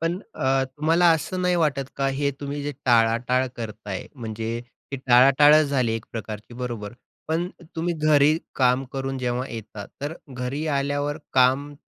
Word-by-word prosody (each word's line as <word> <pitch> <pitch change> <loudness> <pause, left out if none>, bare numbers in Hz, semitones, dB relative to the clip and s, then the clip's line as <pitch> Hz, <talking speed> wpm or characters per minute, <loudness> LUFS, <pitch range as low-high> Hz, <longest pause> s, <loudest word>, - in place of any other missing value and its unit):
पण 165 +3 -1 0.2
अ, 135 0 +1
तुम्हाला 155 +6 +2
असं 180 +3 -3
नाही 180 0 +2
वाटत 140 -5 0
का 135 0 0
हे 145 -1 +1
तुम्ही 145 0 -4
जे 145 - -3
टाळाटाळ 120 +2 +3
करताय. 105 -4 -6
म्हणजे 115 -1 -4 0.3
ती - - -1
टाळाटाळंच 140 +5 +6
झाली 130 -5 +1
एक 115 0 -4
प्रकारची 110 0 -7
बरोबर. 120 -4 -5 0.4
पण 170 +3 0 0.3
तुम्ही 170 +1 -1
घरी 150 0 +5 0.2
काम 130 0 +2
करून 135 0 -3
जेव्हा 125 +1 -2
येता, 110 -2 -7 0.2
तर 145 +3 -3 0.2
घरी 130 +4 -4
आल्यावर 145 +1 -1
काम 135 +3 +3
135 Hz, 150 wpm, -24 LUFS, 120-145 Hz, 0.4 s, टाळाटाळंच